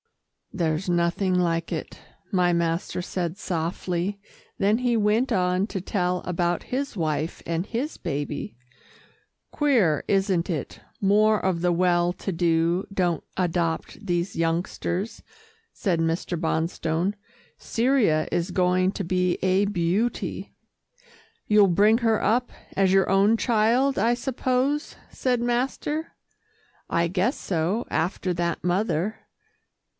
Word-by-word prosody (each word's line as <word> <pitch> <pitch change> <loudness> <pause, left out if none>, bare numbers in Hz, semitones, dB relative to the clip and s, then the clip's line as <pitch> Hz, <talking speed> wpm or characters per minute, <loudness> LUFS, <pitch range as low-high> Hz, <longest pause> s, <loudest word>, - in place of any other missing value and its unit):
"There's 165 +1 -1
nothing 175 +2 +1
like 165 -1 0
it," - - -5 0.3
my 180 -3 +3
master 170 +1 -1
said 175 0 -3
softly, 180 +2 -2 0.4
then 205 +3 +2
he 245 -2 +1
went 215 +4 +2
on 180 +1 +2
to 200 - -4
tell 180 -1 -1
about 175 -1 0
his 265 -3 -3
wife 155 -1 -2
and 165 +2 -1
his 245 +8 -3
baby. 140 -4 -4 0.9
"Queer, 230 - +2
isn't 190 -3 +1
it, 160 -5 -4 0.2
more 210 +2 +4
of 185 -3 -1
the 180 0 +2
well 175 0 +2
to 190 +1 -4
do 170 +1 +1
don't 180 -4 0
adopt 170 -2 -1
these 175 +1 -1
youngsters," 175 +4 -2 0.5
said 180 -5 -1
Mr. 165 +2 -1
Bonstone. 165 +2 -1 0.4
"Cyria 230 - +1
is 175 +2 -1
going 185 +1 +2
to 200 - -3
be 180 0 +1
a 190 +2 +3
beauty." 200 +4 -1 0.9
"You'll 210 -1 +6
bring 210 +5 +4
her 225 -3 +2
up 245 +3 +1 0.2
as 190 -1 +3
your 190 -1 +3
own 200 +4 +4
child, 240 +4 +2
I 230 +4 +3
suppose," 260 +3 -1 0.2
said 250 -2 0
master. 265 +6 -1 0.8
"I 170 0 +2
guess 190 - 0
so 180 +6 -1
after 180 +2 -1
that 170 0 -2
mother." 180 +2 0
185 Hz, 120 wpm, -25 LUFS, 170-215 Hz, 0.9 s, You'll